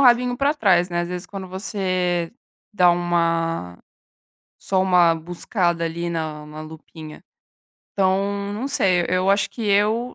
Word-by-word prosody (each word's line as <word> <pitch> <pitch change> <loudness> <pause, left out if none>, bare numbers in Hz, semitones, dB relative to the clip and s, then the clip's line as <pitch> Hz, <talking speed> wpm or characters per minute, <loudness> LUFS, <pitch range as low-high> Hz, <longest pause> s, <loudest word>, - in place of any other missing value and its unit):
rabinho 245 -1 +4
pra 280 +3 +2
trás, 185 - +3
né. 175 0 -1
Às 175 - -5
vezes, 180 0 -5
quando 195 -2 -7
você 185 -2 -2 0.4
dá 180 -4 +5
uma 165 - -1 0.8
só 190 -1 0
uma 180 -3 +4
buscada, 175 +1 -2
ali, 170 +1 -3
na 155 -2 -4
na 155 +1 -9
lupinha. 155 0 -11 0.7
Então, 200 +1 0
não 225 +6 -4
sei, 185 -9 +2
eu 185 +2 +2
acho 200 +1 +2
que 230 - -8
eu 215 +5 +1
180 Hz, 140 wpm, -22 LUFS, 170-200 Hz, 0.8 s, dá